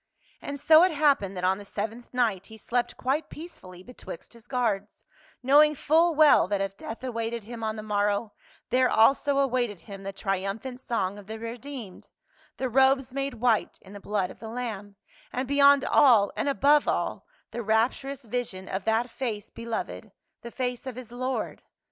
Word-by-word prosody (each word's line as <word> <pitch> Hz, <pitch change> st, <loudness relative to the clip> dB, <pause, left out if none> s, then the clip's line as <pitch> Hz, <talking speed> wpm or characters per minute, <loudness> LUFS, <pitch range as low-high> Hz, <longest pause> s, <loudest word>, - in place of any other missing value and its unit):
And 285 Hz, 0 st, -6 dB
so 315 Hz, +3 st, +7 dB
it 365 Hz, +1 st, +4 dB
happened 280 Hz, -11 st, +2 dB
that 180 Hz, -, -5 dB
on 190 Hz, +2 st, +2 dB
the -, -, -9 dB
seventh 220 Hz, +4 st, -6 dB
night 225 Hz, -7 st, 0 dB
he 220 Hz, -, -12 dB
slept 240 Hz, +3 st, -2 dB
quite 275 Hz, +5 st, -1 dB
peacefully 185 Hz, -, -11 dB
betwixt 245 Hz, -5 st, -11 dB
his 235 Hz, -1 st, -16 dB
guards, 215 Hz, -6 st, -2 dB, 0.4 s
knowing 300 Hz, +3 st, +6 dB
full 325 Hz, +4 st, +3 dB
well 300 Hz, -8 st, +6 dB
that 200 Hz, 0 st, -1 dB
if 195 Hz, 0 st, -3 dB
death 225 Hz, +5 st, -8 dB
awaited 230 Hz, -2 st, -3 dB
him 230 Hz, +1 st, -8 dB
on 220 Hz, 0 st, -2 dB
the 215 Hz, -, -7 dB
morrow, 205 Hz, 0 st, 0 dB, 0.4 s
there 255 Hz, 0 st, +3 dB
also 275 Hz, +5 st, +3 dB
awaited 245 Hz, -8 st, 0 dB
him 200 Hz, -2 st, -10 dB
the 195 Hz, 0 st, -5 dB
triumphant 195 Hz, +6 st, -3 dB
song 205 Hz, -6 st, -2 dB
of 200 Hz, -, -14 dB
the 220 Hz, +1 st, -6 dB
redeemed, 230 Hz, -2 st, -8 dB, 0.5 s
the 260 Hz, -, -1 dB
robes 265 Hz, +1 st, +3 dB
made 275 Hz, -1 st, -3 dB
white 230 Hz, -1 st, +1 dB
in 195 Hz, -, -15 dB
the 205 Hz, -, -8 dB
blood 200 Hz, -2 st, -2 dB
of -, -, -15 dB
the 220 Hz, -, -8 dB
Lamb, 220 Hz, -4 st, -5 dB, 0.4 s
and 255 Hz, +1 st, -3 dB
be 280 Hz, +1 st, -1 dB
yond 280 Hz, -1 st, +6 dB
all 230 Hz, -8 st, +5 dB
and -, -, -1 dB
above 285 Hz, +2 st, +4 dB
all -, -, -2 dB, 0.2 s
the 240 Hz, -, -4 dB
rapturous 240 Hz, +5 st, 0 dB
vision 220 Hz, -5 st, -4 dB
ofthat 220 Hz, +5 st, 0 dB
face 230 Hz, -4 st, -5 dB
beloved, 230 Hz, -1 st, -5 dB, 0.3 s
the 235 Hz, -, -8 dB
face 250 Hz, +1 st, -4 dB
of 255 Hz, -, -5 dB
his 250 Hz, -2 st, -9 dB
Lord. 255 Hz, +2 st, -3 dB
235 Hz, 180 wpm, -27 LUFS, 205-265 Hz, 0.5 s, so